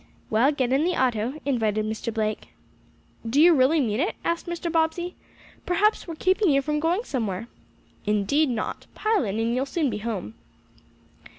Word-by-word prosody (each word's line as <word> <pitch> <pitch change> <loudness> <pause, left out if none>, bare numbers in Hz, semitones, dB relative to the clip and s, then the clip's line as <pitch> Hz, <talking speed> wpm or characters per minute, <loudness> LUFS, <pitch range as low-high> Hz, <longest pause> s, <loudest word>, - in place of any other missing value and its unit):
"Well, 235 +6 +4
get 260 -3 0
in 275 +3 +3
the 360 +1 +1
auto," 250 +2 0
invited 220 -6 0
Mr. 220 +2 -3
Blake. 215 -1 -2 0.8
"Do 230 +5 0
you 340 +2 +8
really 290 +3 +4
mean 225 -5 0
it?" 345 +8 0
asked 335 +1 -1
Mr. 345 0 -3
Bobbsey. 335 +2 0 0.5
"Perhaps 400 +4 +2
we 335 - -5
are - - -8
keeping 375 +3 +2
you 275 -1 +3
from 300 +1 -1
going 340 +8 +1
somewhere." 225 - -3 0.6
"Indeed 210 +9 +2
not. 230 -3 -4
Pile 430 -6 +1
in, 200 +1 -2
and 230 +1 0
you'll 260 +3 0
soon 295 -2 0
be 210 - -3
home." 205 - -4
270 Hz, 175 wpm, -25 LUFS, 225-335 Hz, 0.8 s, you